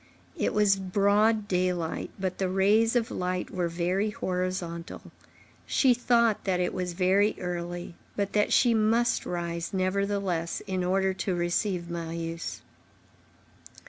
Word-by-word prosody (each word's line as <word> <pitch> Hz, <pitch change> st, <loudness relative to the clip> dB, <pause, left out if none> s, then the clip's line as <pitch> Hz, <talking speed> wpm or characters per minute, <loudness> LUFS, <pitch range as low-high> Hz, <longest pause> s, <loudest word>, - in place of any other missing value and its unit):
—It -, -, 0 dB
was 205 Hz, -2 st, +3 dB
broad 205 Hz, +3 st, +2 dB
daylight, 180 Hz, -3 st, -1 dB
but 185 Hz, -1 st, -3 dB
the 190 Hz, -1 st, 0 dB
rays 210 Hz, +5 st, +3 dB
of 235 Hz, -2 st, +1 dB
light 180 Hz, 0 st, -2 dB
were 180 Hz, -2 st, -1 dB
very 180 Hz, +5 st, 0 dB
horizontal; 180 Hz, -3 st, -4 dB, 0.6 s
she 260 Hz, -3 st, +4 dB
thought 235 Hz, -2 st, +2 dB
that 185 Hz, -2 st, 0 dB
it 180 Hz, -, 0 dB
was 180 Hz, -1 st, -3 dB
very 195 Hz, +4 st, +3 dB
early, 175 Hz, 0 st, -4 dB, 0.2 s
but 200 Hz, -1 st, -2 dB
that 210 Hz, 0 st, +2 dB
she 240 Hz, -2 st, +4 dB
must 225 Hz, +2 st, +2 dB
rise, 170 Hz, +1 st, -3 dB
nevertheless, 190 Hz, -2 st, -1 dB
in 185 Hz, -1 st, -2 dB
order 190 Hz, +1 st, +1 dB
to 185 Hz, -1 st, -2 dB
receive 175 Hz, +1 st, -1 dB
Marius. 165 Hz, 0 st, -5 dB
185 Hz, 130 wpm, -28 LUFS, 175-205 Hz, 0.6 s, she